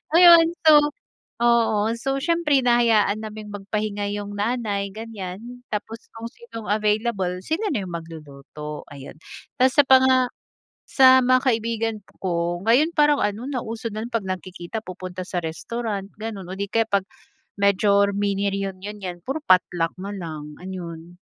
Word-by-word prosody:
Ayun. 340 -2 +8 0.2
So 310 - +9 0.7
oo. 230 -3 +3 0.2
So, 270 +3 -2
siyempre 330 -4 +2
hinahayaan 225 -3 +3
naming 215 -1 -8
magpahinga 205 0 -3
yung 205 0 -5
nanay, 205 -3 -1
ganiyan. 210 -4 -7 0.3
Tapos 220 +2 -5
kung 225 - -7
sinong 445 - -10
available, 210 -3 0
sila 375 +7 -1
na 200 -3 -2
yung 175 - -8
magluluto, 150 -2 -8
ayun. 140 -1 -10 0.5
Tapos 260 +1 +5
sa 290 - +7
panga 260 -1 +5 0.6
sa 260 -1 +7
mga 255 +1 +4
kaibigan 225 -2 0 0.2
ko, 175 -1 -1
ngayon 295 +8 +4
parang 295 -2 +4
ano, 210 +5 -2
nauso 230 -4 -4
na 215 +1 -4
'pag 230 -4 -2
nagkikita 185 +3 -5
pupunta 185 -1 -7
sa 180 - -2
restaurant, 200 +4 -4
ganun 215 -4 -6
o - - -5
di 200 - -2
kaya 230 - +3
'pag 195 -1 +1 0.5
major 200 0 +3
mini 200 0 0
reunion, 195 +1 -5
yan, 180 -2 -6
puro 275 +4 -3
potluck 175 -2 +2
nalang, 165 -7 -7
ayun. 175 -2 -8
210 Hz, 140 wpm, -23 LUFS, 185-235 Hz, 0.7 s, So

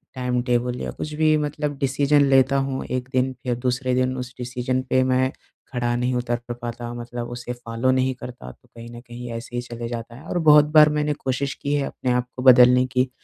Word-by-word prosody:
Timetable 125 -1 -1
या - - -4
कुछ 150 - -6
भी 155 0 +3
मतलब 150 -1 -3
डिसीजन 140 +2 +2
लेता 135 0 +4
हूँ, 135 -1 -2
1 130 +1 -4
दिन 130 +1 +1
फिर 125 -2 -1
दूसरे 125 +1 -1
दिन 130 0 +1
उस 125 0 -6
डिसीजन 125 +1 -2
पे 130 0 +3
मैं 130 +1 +1 0.4
खड़ा 120 -1 -1
नहीं 125 +1 0
उतर 120 0 -1
प - - -1
पाता 120 0 -5
मतलब 120 0 -6
उसे 120 0 -6
फॉलो 120 +1 -1
नहीं 130 0 +1
करता। 125 - -9
तो, - - -24
कहीं 115 0 -12
न 120 - -9
कहीं 120 0 -9
ऐसे 120 +1 -9
ही 120 - -1
चले 120 -1 -7
जाता 115 0 -6
है 135 - -13
और - - -2
बहुत 150 -2 +7
बार 155 0 +8
मैंने 150 0 0
कोशिश 135 0 -2
की 145 - -4
है, 145 -1 +1
अपने 125 - -3
आप 125 0 0
को 125 - -5
बदलने 125 0 +7
की, 130 0 0
125 Hz, 220 wpm, -23 LUFS, 120-135 Hz, 0.4 s, बार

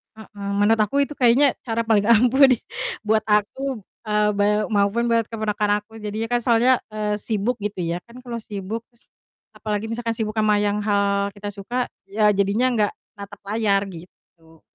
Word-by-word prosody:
Mhm. 205 -2 -7
Menurut 225 +1 +3
aku 280 +7 +2
itu 295 - -6
kayaknya 255 +2 +4
cara 230 0 -1
paling 215 -3 +2
ampuh 250 +4 +6
di 255 -3 +3 0.5
buat 215 0 +2
aku, 215 +4 0 0.3
eee, 210 0 +2
beu 205 +1 +2
maupun 205 +3 +2
buat 230 -1 +2
keponakan 210 -2 -1
aku. 225 +1 -14
Jadinya 215 +2 -4
kan 240 - +3
soalnya, 240 +2 +3
eee, 210 -1 -1
sibuk 225 +3 -1
gitu 200 -3 -4
ya. 170 +1 -2
Kan 250 +2 -13
kalau 235 -2 -5
sibuk 210 +1 -5
terus 235 - -22 0.5
apalagi 215 0 -3
misalkan 230 0 -2
sibuk 220 -1 -3
sama 210 -1 +3
yang 205 0 0
hal 200 -1 +1
kita 205 0 -6
suka 225 +5 -3 0.2
iya 210 +2 +2
jadinya 205 +5 +2
enggak 215 -4 +1 0.3
natap 200 0 -10
layar 205 -1 +1
gitu. 165 -2 -16
215 Hz, 170 wpm, -22 LUFS, 205-230 Hz, 0.5 s, ampuh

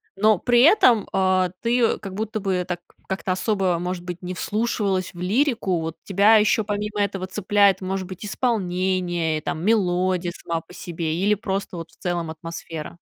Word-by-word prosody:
но 210 +1 +4
при 240 +3 +4
этом, 250 - +5
э, 185 -1 +2
ты 235 - -1
её 240 -2 +2
как 195 -2 -7
будто 215 +2 -3
бы 190 -3 0
так 180 -1 -3 0.3
как-то 190 -1 -1
особо, 190 -3 0
может 180 +1 -4
быть, 180 0 -6
не 180 +1 -4
вслушивалась 200 -2 -1
в 175 - -11
лирику. 215 - +1
Вот 160 0 -4
тебя 200 +3 +5
еще 215 +1 +3
помимо 210 0 -2
этого 195 -2 -2
цепляет, 200 0 +2
может 185 0 -3
быть, 190 +2 -8
исполнение 185 -7 0
и - - -5
там 160 +2 -4
мелодия 185 -4 +1
сама 165 -1 -4
по 170 - -17
себе, 165 -3 -4
или 200 +4 +2
просто 195 -2 -4
вот 165 0 -8
в - - -23
целом 175 -3 -2
атмосфера? 165 0 -7
185 Hz, 180 wpm, -23 LUFS, 175-210 Hz, 0.3 s, этом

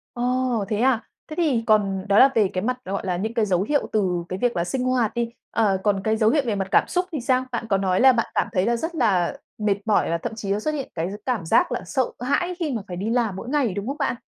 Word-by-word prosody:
Ồ! 245 -3 0
Thế 210 -2 -1
à? 245 -2 +1 0.2
Thế 310 - -7
thì 290 -9 +1
còn 195 -3 +2
đó 200 +1 +5
là 270 - +8
về 215 -3 +4
cái 185 - -1
mặt 250 +2 -1
gọi 195 +1 -3
là 180 -1 -1
những 220 +5 -3
cái 225 -3 +1
dấu 185 -2 +1
hiệu 290 +7 0
từ 180 -5 0
cái 185 +1 -4
việc 245 -3 +1
là 170 - +1
sinh 250 +8 -2
hoạt 255 -4 +1
đi, 235 -1 -1 0.2
ờ, 205 -4 +2
còn 205 -2 +1
cái 220 0 +1
dấu 215 -1 +4
hiệu 290 +2 +2
về 215 -3 0
mặt 195 -1 -2
cảm - - +4
xúc 360 0 0
thì 295 -6 -3
sao? 255 +1 +1
Bạn 235 -1 -3
có 195 - +3
nói 190 -1 +1
là 265 0 +7
bạn 230 -2 0
cảm - - +1
thấy 185 -1 +1
là 235 - +2
rất 325 +8 -4
là 195 - +1 0.2
mệt 210 -2 +1
mỏi, 215 -6 +2
và 170 - +1
thậm 225 +6 -5
chí 205 -3 -4
nó 205 - +1
xuất 305 - -1
hiện 275 -3 -4
cái 170 +3 -2
gi - - -5
cảm 235 -10 -1
giác - - +3
là - - -2
sợ 255 +8 0
hãi 350 +9 0
khi 310 -4 -1
mà 225 -4 -2
phải 180 - -6
đi 205 +5 -2
làm 230 -5 0
mỗi 230 +6 -7
ngày, 270 -9 +1
đúng 200 +4 -4
không 280 - -3
bạn? 280 - 0
225 Hz, 295 wpm, -23 LUFS, 195-255 Hz, 0.2 s, là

